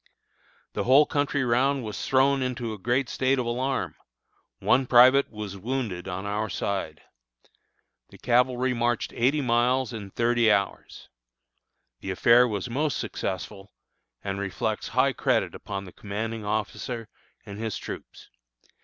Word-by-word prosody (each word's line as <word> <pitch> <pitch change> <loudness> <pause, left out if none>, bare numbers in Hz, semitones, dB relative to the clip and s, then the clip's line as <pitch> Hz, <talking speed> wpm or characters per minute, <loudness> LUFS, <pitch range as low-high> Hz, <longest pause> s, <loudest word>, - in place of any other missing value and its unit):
The - - -2
whole 135 +4 +6
country 145 -1 0
round 130 +3 +2
was 105 -2 -5
thrown 135 +1 +3
into 125 -3 -3
a 105 - -9
great 120 +6 0
state 130 +2 +1
of 125 - -1
alarm. 130 +3 -1 0.6
One 130 - +2
private 130 +3 +6
was 105 -3 -7
wounded 110 -5 -3
on 95 +2 -4
our 105 +2 -2
side. 95 -8 -3 1.1
The - - -15
cavalry 125 +1 +2
marched 120 -1 -1
eighty 135 +5 +2
miles 125 0 +1
in 105 -3 -7
thirty 115 +1 +2
hours. 100 -1 -2 0.9
The - - -7
affair 120 +6 +5
was 105 -3 -3
most 140 +3 -1
successful, 95 +1 -5 0.5
and 100 0 -3
reflects 100 +2 -2
high 130 +3 +2
credit 115 -11 0
upon 100 -1 -6
the 90 - -11
commanding 110 +2 -5
officer 110 +2 -3 0.4
and 100 0 -8
his 110 -2 -3
troops. - - -9
120 Hz, 135 wpm, -26 LUFS, 105-130 Hz, 1.1 s, whole